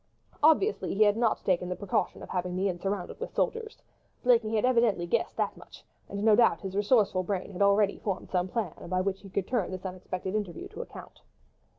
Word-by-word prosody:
Obviously 320 - +3
he 215 - +5
had 205 -1 +4
not 230 -1 0
taken 180 -1 +1
the 180 - -2
precaution 200 -1 -2
of - - -10
having 180 -1 -2
the 190 +2 +1
inn 180 -2 -2
surrounded 195 0 -3
with - - -6
soldiers. 455 -1 -2 0.4
Blakeney 230 -3 +3
had 215 - +2
evidently 235 -8 +3
guessed 170 - -1
that - - 0
much, - - -15 0.3
and 200 0 -4
no 220 -1 +6
doubt 235 - +4
his 195 -2 -5
resourceful 205 -2 +3
brain 190 +1 -3
had 185 - -6
already 200 0 +3
formed 195 -3 -4
some 180 -1 +1
plan 190 -4 -2 0.2
by 185 +1 +1
which 195 +1 -1
he 195 - -11
could 190 0 -2
turn 240 -8 0
this 185 0 -7
unexpected 185 0 -5
interview 205 -6 -3
to - - -7
account. - - -11
200 Hz, 210 wpm, -29 LUFS, 185-220 Hz, 0.4 s, no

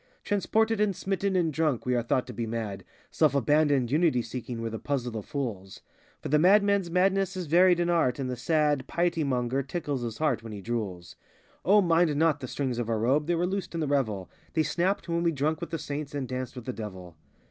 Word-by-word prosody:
Transported 220 +1 +1
and 205 -3 +2
smitten 195 +1 -1
and 165 -4 +1
drunk, 150 -5 0
we 125 - +1
are 120 - +2
thought 120 +2 0
to 125 - -8
be 115 +1 -3
mad; 110 -4 -4 0.3
Self 150 -3 +2
abandoned, 140 -1 +2
unity 150 -5 +2
seeking, 120 0 -6
we're 115 0 -3
the 110 - -5
puzzle 125 -5 -2
of 110 - -5
fools; 115 -10 -5 0.4
For - - -4
the 150 +2 +4
madman's 200 +1 +4
madness 190 +2 +1
is 180 - -3
varied 175 +3 +5
in 175 - +1
art, 165 -8 +2
and 135 -2 -3
the 125 - -3
sad 145 +1 +1
Piety 170 -1 0
monger 130 -1 0
tickles 140 -1 -3
his 115 -2 -4
heart 145 -8 +1
while 115 -1 -8
he 105 - -6
drools. 100 -5 -5 0.5
O, 205 +3 +5
mind 170 -3 +3
not 160 0 +2
the 130 - -6
strings 130 -2 -2
of 115 -1 -2
our 115 - +1
robe, 135 +7 +1
they 175 - +2
were 170 +1 +1
loosed 190 -1 -3
in - - -1
the 155 - 0
revel;— 110 -10 0 0.3
They 160 - +2
snapped 180 +3 0
when 170 0 0
we 170 -1 +2
drank 155 +2 -1
with - - -4
the 165 - -2
saint 145 -1 -5
and 135 -3 -3
danced 130 0 -5
with 125 -3 -8
the 130 - -3
devil. 95 -6 -8
145 Hz, 225 wpm, -28 LUFS, 120-170 Hz, 0.5 s, varied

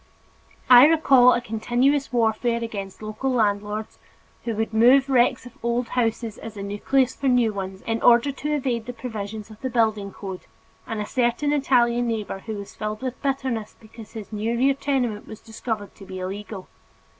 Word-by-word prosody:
I 250 +2 +9
recall 275 -6 +6
a 240 - 0
continuous 245 +5 0
warfare 235 0 +1
against 200 -3 -6
local 215 +5 -3
landlords 210 -2 -1 0.5
who 230 -2 -2
would 220 +1 -2
move 255 +5 +5
wrecks 250 0 +3
of 245 - -10
old 235 0 -1
houses 230 -2 -1
as 220 -2 -9
a 200 - -5
nucleus 250 +6 +1
for 275 - -3
new 245 -4 +3
ones 190 -1 -6
in 225 0 -2
order 240 +4 +5
to 295 +2 -4
evade 245 -5 -2
the 245 - -5
provisions 220 -2 -6
of 215 - -14
the 260 - -2
building 220 -4 0
code, 190 -2 -8 0.4
and 225 -2 -4
a 210 - -2
certain 250 +5 0
Italian 245 -4 +2
neighbor 215 -4 -3
who 220 +2 -6
was 200 -1 -8
filled 215 +2 -5
with 255 -1 -4
bitterness 265 -5 -2
because 220 -1 -13
his 220 -1 -8
new 220 +3 -1
rear 270 +3 +3
tenement 260 -6 -2
was 220 - -9
discovered 220 -2 -5
to 195 - -13
be 190 -1 -7
illegal. 195 +1 -6
230 Hz, 180 wpm, -24 LUFS, 215-250 Hz, 0.5 s, I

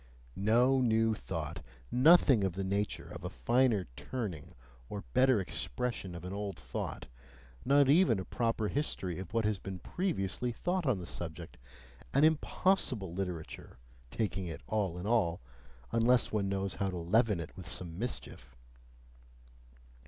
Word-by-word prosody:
No 120 +6 +3
new 115 -2 +3
thought, 65 - -5 0.3
nothing 135 - +6
of 95 -3 0
the 95 +2 -3
nature 100 +2 -2
of - - -8
a - - -3
finer 110 - +2
turning 90 - -5 0.3
or 100 - -5
better 130 -2 +5
expression 95 - -3
of 85 - -8
an 90 - -5
old 100 -2 -4
thought, 65 -1 -5 0.6
not 140 +1 +5
even 145 - +5
a 95 - -5
proper 115 -2 0
history 95 - -2
of 95 -2 -7
what 115 -1 +1
has 105 -2 0
been 95 -1 -6
previously 125 - -2
thought 175 +6 -1
on 125 -6 +3
the 90 - -6
subject: 85 -5 -7 0.6
an 140 - +5
IMPOSSIBLE 155 - +2
literature, 90 -8 -5 0.3
taking 95 - -2
it 80 - -6
all 100 -5 -1
in 90 - -5
all, 100 -7 +2 0.5
unless 120 +2 +3
one 100 -2 0
knows 95 -1 -1
how 95 +4 -1
to 90 - -4
leaven 100 +3 +2
it 80 - -7
with 90 -4 -9
some 85 -1 -4
mischief. - - -5
100 Hz, 150 wpm, -32 LUFS, 90-125 Hz, 0.6 s, nothing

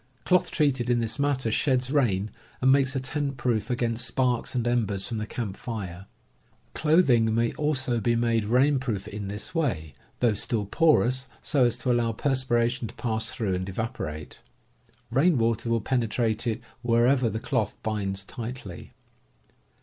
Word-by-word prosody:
Cloth 180 -1 +3
treated 135 -6 +1
in 120 -1 +3
this 110 0 -2
manner 140 -5 +1
sheds 130 +1 +1
rain, 110 -8 +1 0.3
and 130 +1 +4
makes 135 0 +3
a - - +1
tent 140 +1 -3
proof 120 -1 -1
against 120 -1 0
sparks 125 -1 0
and 120 -2 0
embers 105 -5 0
from 115 -2 -3
the 110 - -4
camp 110 -4 -4
fire. 95 -6 -6 0.7
Clothing 130 -9 +3
may 115 0 +2
also 130 -5 0
be 120 +2 +1
made 115 -2 +1
rain 130 +5 +3
proof 110 -6 -3
in 105 -1 -6
this 105 +8 -5
way, 110 - -1 0.3
though 120 -3 +3
still 105 +1 -1
porous, 130 0 +2 0.2
so 135 -4 +3
as 120 - +1
to 125 - -1
allow 120 -1 +1
perspiration 125 -2 0
to - - -12
pass 110 -1 -1
through 105 -6 -2
and 95 +1 -3
evaporate. 95 - -5 0.7
Rain 145 +6 +3
water 115 0 0
will 115 -1 +1
penetrate 115 -1 0
it 115 +1 -1 0.2
wherever 120 +1 +3
the 110 - -3
cloth 115 -4 -1
binds 100 -3 -2
tightly. 115 -6 -7
120 Hz, 160 wpm, -26 LUFS, 110-130 Hz, 0.7 s, and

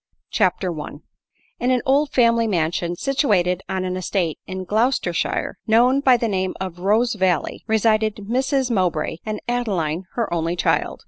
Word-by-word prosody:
CHAPTER 180 -3 +1
L 150 0 -8 0.6
In 245 - 0
an 255 -1 +2
old 280 +2 +3
family 230 -3 +3
mansion, 175 -2 -1
situated 190 - +1
on 190 -1 -2
an 185 0 -2
estate 185 -3 -2
in 185 0 -5
Gloucestershire, 210 -3 0
known 245 +5 +4
by 260 -3 +5
the 235 - -1
name 190 -3 -1
of 185 -2 -5
Rosevalley, 200 -2 +1
resided 220 -1 +2
Mrs 260 +5 -1
Mowbray, 185 -6 0
and 215 -1 -3
Adeline 190 -9 -1
her 235 -3 -1
only 165 0 -1
child. - - 0
205 Hz, 145 wpm, -21 LUFS, 180-240 Hz, 0.6 s, by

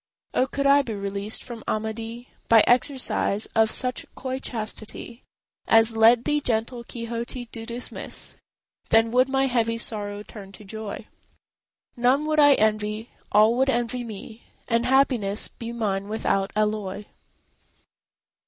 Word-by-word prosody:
Oh, 260 - +2
could 280 +1 -3
I 280 +1 +6
be 230 -6 -5
released 200 +1 -3
from 235 -3 -8
Amadis 225 +2 -3 0.2
By 225 -2 +7
exercise 250 -4 +2
of 220 0 +4
such 250 +2 -1
coy 260 0 -4
chastity 225 0 -5 0.5
As 225 0 +5
led 230 +2 +5
thee 295 0 +1
gentle 235 0 -1
Quixote 235 +1 -4
to 225 -1 -8
dismiss! 240 +1 -5 0.5
Then 225 0 +4
would 255 +2 +3
my 270 0 +2
heavy 230 -3 +1
sorrow 205 -3 -4
turn 200 -2 -11
to 210 - -12
joy; 215 0 -7 0.9
None 255 +5 +2
would 310 0 +1
I 290 -1 +7
envy, 215 +1 0 0.2
all 215 +2 +5
would 265 +1 +2
envy 240 -1 -1
me, 220 0 -9 0.3
And 230 +1 +1
happiness 250 -6 +2
be 230 0 -8
mine 200 -4 -2
without 195 -3 0
alloy. 210 -1 -1
230 Hz, 135 wpm, -25 LUFS, 215-250 Hz, 0.9 s, By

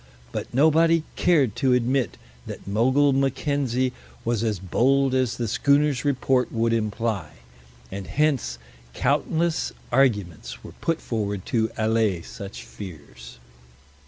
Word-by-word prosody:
But - - -5
nobody 160 +4 +4
cared 145 - +3
to 130 -3 +3
admit 125 +1 +1 0.3
that - - -8
Mogul 130 +7 +3
Mackenzie 135 -2 0 0.3
was 115 -1 0
as 110 -3 0
bold 130 +9 +2
as 130 -3 +1
the 120 - -2
schooner's 140 +4 +2
report 130 -2 +1
would 115 0 +1
imply, 110 -2 -1 0.6
and 100 -1 -6
hence 145 - 0 0.4
countless 165 0 0 0.2
arguments 105 - 0
were - - -9
put 165 -1 0
forward 105 -4 -3
to 110 -2 +2
allay 110 -5 +1
such 100 0 -8
fears. 70 -10 -11
125 Hz, 120 wpm, -24 LUFS, 105-140 Hz, 0.6 s, nobody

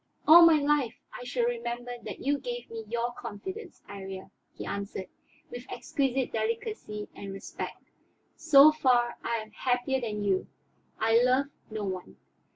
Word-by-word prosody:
"All 340 +2 +10
my 320 -2 +6
life 285 -5 +1 0.2
I - - -7
shall 245 -1 0
remember 240 +1 -3
that - - -7
you 285 +1 +1
gave 245 -3 -6
me 225 -1 -6
your 235 +2 -1
confidence, 375 - -8
Iría," 190 -1 -8 0.2
he - - -8
answered, 200 -2 -5 0.4
with 245 0 -7
exquisite 270 -2 -1
delicacy 220 - -3
and 195 - -8
respect. 195 - -7 0.4
"So 305 -1 +7
far 250 -5 +2
I 235 - 0
am 215 -1 -5
happier 250 +3 0
than 210 -3 -3
you; 195 -2 +1 0.5
I 225 +1 +4
love 255 +3 +3 0.2
no 215 -1 -4
one. 185 -2 -5
240 Hz, 150 wpm, -29 LUFS, 215-270 Hz, 0.5 s, All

